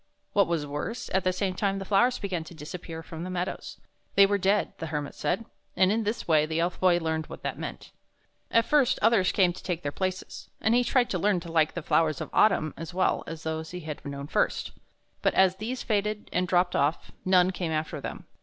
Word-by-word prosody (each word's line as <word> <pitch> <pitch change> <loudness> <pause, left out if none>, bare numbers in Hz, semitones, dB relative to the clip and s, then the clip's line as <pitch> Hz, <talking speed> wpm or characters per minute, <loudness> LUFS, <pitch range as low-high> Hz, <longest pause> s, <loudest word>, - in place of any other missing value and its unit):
What 200 -2 +4
was 165 -3 -1
worse, 150 +11 -5
at 190 - +2
the 185 - +2
same 185 0 -1
time 195 +1 0
the 195 - -5
flowers 240 +6 +3
began 185 -5 -3
to 170 - -11
disappear 160 +1 -7
from 160 0 -7
the 180 - -5
meadows. 180 0 -4 0.4
They 200 - +8
were 200 0 +1
dead, 200 +2 +2
the 165 - -4
Hermit 150 -2 -3
said, 180 +9 -1 0.3
and 185 +1 +4
in 220 0 0
this 215 +3 -2
way 155 -2 +4
the 160 +1 -1
Elf 175 +1 -1
Boy 180 -2 +4
learned 160 -2 -2
what - - -10
that - - -3
meant. - - -7 0.6
At 230 0 +3
first 270 -4 +3
others 220 -5 +4
came 180 -3 +3
to - - -10
take 175 -2 -3
their 145 - -2
places, 185 +3 -4
and 220 - +2
he 245 +1 +4
tried 245 0 +2
to 185 - 0
learn 200 0 +2
to 170 -1 -8
like 160 -2 +2
the 170 - -4
flowers 155 -2 +2
of - - -6
autumn 175 -7 +3
as 165 +2 -7
well 185 - +1
as 160 -1 -7
those 160 0 -3
which 180 - -5
he - - -13
had 150 -2 -6
known 140 -1 -5
first. - - 0 0.5
But - - +2
as 190 0 +4
these 240 +5 -4
faded 210 -1 -1
and 180 0 +1
dropped 180 0 +2
off, 145 +4 0
none 185 0 +4
came 175 -3 -3
after 155 -1 -2
them. - - -6
180 Hz, 230 wpm, -27 LUFS, 160-200 Hz, 0.6 s, They